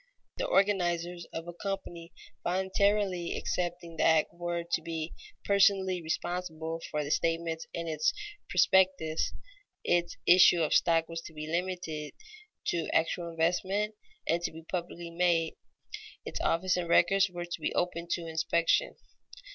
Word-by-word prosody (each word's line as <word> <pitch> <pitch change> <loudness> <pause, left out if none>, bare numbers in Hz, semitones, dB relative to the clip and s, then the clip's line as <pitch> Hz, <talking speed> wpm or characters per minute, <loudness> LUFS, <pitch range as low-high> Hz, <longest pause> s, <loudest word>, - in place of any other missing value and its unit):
The - - -1
organizers 175 - +1
of 165 +1 -6
a 175 - -6
company 175 -2 -5 0.3
voluntarily 190 0 +1
accepting 175 -2 -3
the - - +1
act 160 -1 +4
were 175 0 -3
to 170 -1 -1
be 165 0 -4 0.3
personally 195 -2 +3
responsible 165 -1 -3
for 150 -1 -1
the 145 - -4
statements 165 0 0
in 170 0 -4
its 155 -1 +1 0.4
prospectus; 185 -4 +3 0.5
its 175 0 +1
issue 175 -1 +7
of 155 - +1
stock 165 -1 +3
was 165 0 -5
to 160 - -13
be 155 0 -6
limited 170 -2 -3 0.6
to 170 -2 -1
actual 170 +1 +1
investment 185 +6 0 0.3
and 170 +1 +2
to - - -2
be 160 0 -11
publicly 170 0 -5
made; 170 -1 +1 0.7
its - - -4
office 180 +2 +2
and 175 -1 -3
records 195 +3 +4
were 175 -1 -5
to 175 -2 -6
be - - 0
open 175 -1 -1
to 170 - -3
inspection. 165 - +1
170 Hz, 140 wpm, -30 LUFS, 165-180 Hz, 0.7 s, issue